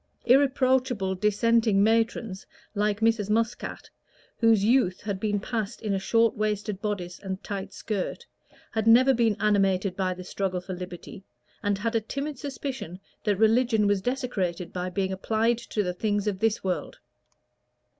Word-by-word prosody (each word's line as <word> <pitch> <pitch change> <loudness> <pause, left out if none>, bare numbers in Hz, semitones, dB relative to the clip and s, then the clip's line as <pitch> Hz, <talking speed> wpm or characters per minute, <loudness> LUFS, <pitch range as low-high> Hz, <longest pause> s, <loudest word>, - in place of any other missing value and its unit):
Irreproachable 255 -6 +3
Dissenting 210 +1 +2
matrons, 225 -2 0 0.3
like 210 0 0
Mrs. 225 -2 +2
Muscat, 225 +2 -1 0.5
whose 225 -4 +4
youth 230 -6 +2
had 200 -2 -3
been 205 0 0
passed 220 0 -3
in 215 -3 -2
a 195 - 0
short 230 +3 +2
waisted 210 -1 -2
bodice 185 -4 -3
and 190 -1 -6
tight 195 -2 -5
skirt, 205 -4 -4 0.5
had 220 0 -1
never 255 +4 +7
been 230 -4 +2
animated 195 -2 +2
by 185 -1 -1
the 185 - -8
struggle 185 0 -2
for 185 +1 -7
liberty, 180 +2 -8 0.4
and 205 -1 0
had 225 +3 -2
a 225 - +2
timid 280 +5 -5
suspicion 265 - -5 0.3
that 205 -3 +2
religion 225 0 +3
was 205 -1 +2
desecrated 195 -8 -2
by 180 0 -3
being 190 0 -1
applied 225 +4 +1
to 215 -3 -2
the 180 -1 -2
things 205 +2 -1
of 200 -3 -1
this 225 0 +1
world. 185 -2 -3
210 Hz, 155 wpm, -26 LUFS, 190-230 Hz, 0.5 s, never